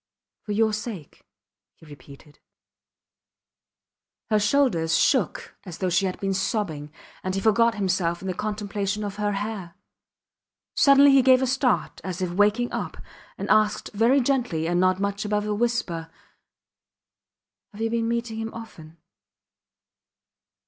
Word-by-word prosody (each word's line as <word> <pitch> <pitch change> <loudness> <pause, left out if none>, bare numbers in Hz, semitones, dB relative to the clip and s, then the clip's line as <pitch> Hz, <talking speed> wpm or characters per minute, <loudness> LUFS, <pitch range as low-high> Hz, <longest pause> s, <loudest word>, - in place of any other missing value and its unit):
For 210 - -7
your 220 +1 +2
sake, 210 - -7 0.5
he 160 - -19
repeated. 145 0 -15 1.9
Her 215 - +4
shoulders 205 - +2
shook - - 0
as 180 -4 -9
though 185 -2 -1
she 190 +2 +2
had 185 - -5
been 195 -1 -1
sobbing, 180 -7 -2 0.3
and 185 0 -2
he - - 0
forgot 225 +2 +3
himself 185 -4 0
in 190 - -7
the 185 - -1
contemplation 205 0 -3
of 205 -1 -5
her 205 -1 -1
hair. 195 -4 -5 1.0
Suddenly 280 0 +6
he 270 -1 +6
gave 255 0 +5
a - - +3
start, 260 0 0
as 185 -2 -5
if 180 -2 -2
waking 210 +6 +2
up, - - -4 0.4
and - - -5
asked 215 -1 +2
very 230 +6 +3
gently 240 - 0
and 175 +1 +1
not 185 0 +2
much 200 +1 -2
above 210 0 -1
a 210 - -1
whisper 205 -8 -2 1.6
Have 210 +1 -10
you 225 0 -1
been 230 -1 0
meeting 235 -1 -2
him 225 0 -4
often? 165 -8 -11
205 Hz, 140 wpm, -24 LUFS, 185-225 Hz, 1.9 s, Suddenly